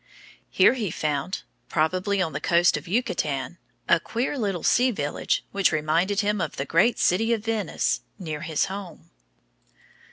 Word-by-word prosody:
Here - - +5
he 225 -7 -2
found, 150 +3 -2 0.3
probably 185 +5 +1
on 160 -4 -4
the 140 - -4
coast 175 0 +3
of - - -6
Yucatan, 175 - -1 0.3
a 170 - +5
queer 235 - -2
little 200 - -2
sea 250 +1 +4
village 145 - -1
which 195 -2 +2
reminded 165 +6 +1
him 205 -1 0
of - - -3
the 135 - -3
great 185 - +3
city 225 +6 +2
of 220 -1 -3
Venice 220 -6 -1 0.2
near 155 -6 -5
his 155 -2 0
home. 190 - -8
185 Hz, 155 wpm, -25 LUFS, 155-210 Hz, 0.3 s, Here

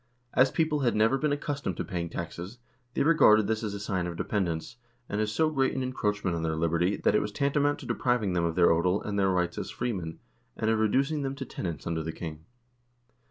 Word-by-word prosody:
As 130 +1 +5
people 155 0 +1
had 125 -4 +1
never 110 +4 +4
been 150 - +1
accus 145 0 -2
tomed 90 - -2
to - - -1
paying 85 -4 -3
taxes, 85 +6 -6 0.4
they - - +2
regarded 110 -9 +6
this 110 +1 -1
as 105 -2 -3
a - - -5
sign 95 -4 -2
of 85 - -5
dependence, 90 0 -2 0.3
and 105 - -1
as 105 0 0
so 155 +8 +2
great 135 -3 +1
an 130 - -1
encroachment 105 -7 -1
on 85 - -2
their 80 -1 -1
liberty 85 +4 +1
that - - +2
it 105 - +3
was 105 - -3
tanta 140 +5 +1
mount 145 0 +2
to - - -9
depriving 120 -6 0
them 85 -1 +1
of 85 -1 0
their 90 -1 +5
odel 90 +4 +2
and 100 -1 -1
their 95 -1 +3
rights 90 -2 0
as - - -5
freemen, 95 -10 -3 0.4
and 110 - +1
of 110 - +1
reducing 135 +8 +2
them 135 0 -2
to 135 -1 -5
tenants 85 -9 -5
under 85 -1 -1
the 80 +1 -3
king. 80 -1 -7
105 Hz, 235 wpm, -28 LUFS, 85-130 Hz, 0.4 s, regarded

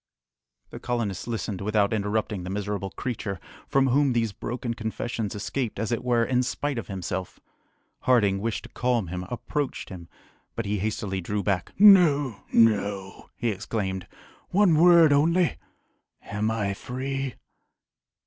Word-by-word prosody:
The - - -8
colonists 115 -6 -3
listened 110 -4 -3
without 105 0 +1
interrupting 105 -1 -1
the 90 - -5
miserable 100 0 -3
creature, 105 -4 -4 0.3
from 135 0 +3
whom 135 +1 +3
these 115 -2 +1
broken 120 +3 -4
confessions 110 -1 -4
escaped, 115 +3 -3
as 110 +3 -2
it 120 - -1
were, 120 -2 +2
in 125 +1 +1
spite 135 +1 -2
of - - -7
himself. 95 -1 -5 0.7
Harding 105 -6 +3
wishing 115 +2 -2
to - - -11
calm 120 -7 0
him, 90 +1 -5
approached 140 +3 -3
him, 85 -3 -9 0.5
but 115 - -3
he 100 0 -1
hastily 100 -2 -2
drew 105 +3 -2
back. 95 -4 -1
"No! 160 - +6
no!" 100 -4 +1
he 120 -3 -1
exclaimed; 95 -2 -3 0.4
"one 195 -2 +4
word 165 -1 +7
only 165 +4 +3 0.7
am 105 +2 -2
I 105 -3 -1
free?" 130 +3 -4
110 Hz, 140 wpm, -26 LUFS, 100-130 Hz, 0.7 s, word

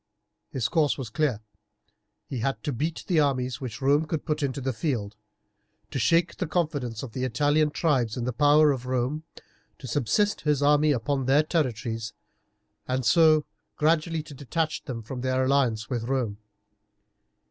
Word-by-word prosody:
His 125 -4 -1
course 150 0 +1
was 125 -5 -6
clear. 140 -8 0 0.8
He 130 - -5
had 135 +4 -2
to 145 - -2
beat 155 +7 -3
the 175 -4 +2
armies 130 -4 0
which 120 -1 -6
Rome 145 +3 +3
could 160 -1 -3
put 150 -1 -1
into 140 -1 -1
the 130 0 -2
field; 110 -5 -2 0.8
to 135 - -2
shake 165 +9 +2
the 185 - -2
confidence 145 -9 -2
of 130 - -7
the 130 +3 -4
Italian 145 +5 +2
tribes 135 -8 0
in 120 - -2
the 125 +1 -2
power 145 +3 +5
of 130 -2 -4
Rome; 130 +5 -1 0.5
to - - -11
subsist 145 - +1
his 150 -2 +1
army 150 +1 +4
upon 135 +1 -1
their 140 +3 +5
territories, 120 -8 -2 0.7
and 130 -1 -1
so 155 +5 +5 0.3
gradually 160 +1 +1
to 150 - -11
detach 155 +4 -2
them 115 -4 -5
from 125 +3 -6
their 130 0 +1
alliance 130 -5 +1
with 120 -3 -3
Rome. 120 -5 -2
135 Hz, 165 wpm, -26 LUFS, 125-150 Hz, 0.8 s, power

